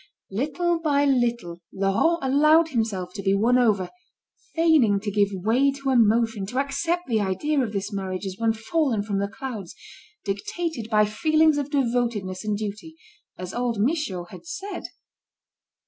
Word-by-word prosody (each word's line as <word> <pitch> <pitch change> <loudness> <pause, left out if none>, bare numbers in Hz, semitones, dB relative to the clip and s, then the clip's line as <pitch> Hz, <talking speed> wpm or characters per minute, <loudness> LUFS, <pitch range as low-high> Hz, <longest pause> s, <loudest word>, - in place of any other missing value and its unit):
Little 330 - 0
by 290 -3 +2
little 235 -10 0
Laurent 195 - +1
allowed 305 +5 +4
himself 210 - -2
to 200 - -5
be 195 0 +2
won 240 +5 +3
over, 205 -7 +2 0.6
feigning 310 -12 +4
to 205 +1 -4
give 200 0 +3
way 225 +9 +2
to 275 -1 -2
emotion, 225 -3 +2
to 245 - -5
accept 330 +6 0
the 225 -3 +1
idea 275 +10 0
of 235 -5 -2
this 200 0 -4
marriage 190 -1 -4
as 190 -1 -4
one 225 -1 +2
fallen 225 0 0
from 200 -2 -2
the 200 - 0
clouds, 220 -5 -7 0.5
dictated 230 - -3
by 210 -1 +4
feelings 310 +7 +2
of 285 0 -3
devotedness 235 -8 -1
and 210 -1 -1
duty, 215 +10 -6 0.4
as 180 0 -7
old 240 -3 -1
Michaud 225 - 0
had - - -12
said. 400 +4 -6
230 Hz, 155 wpm, -24 LUFS, 200-285 Hz, 0.6 s, allowed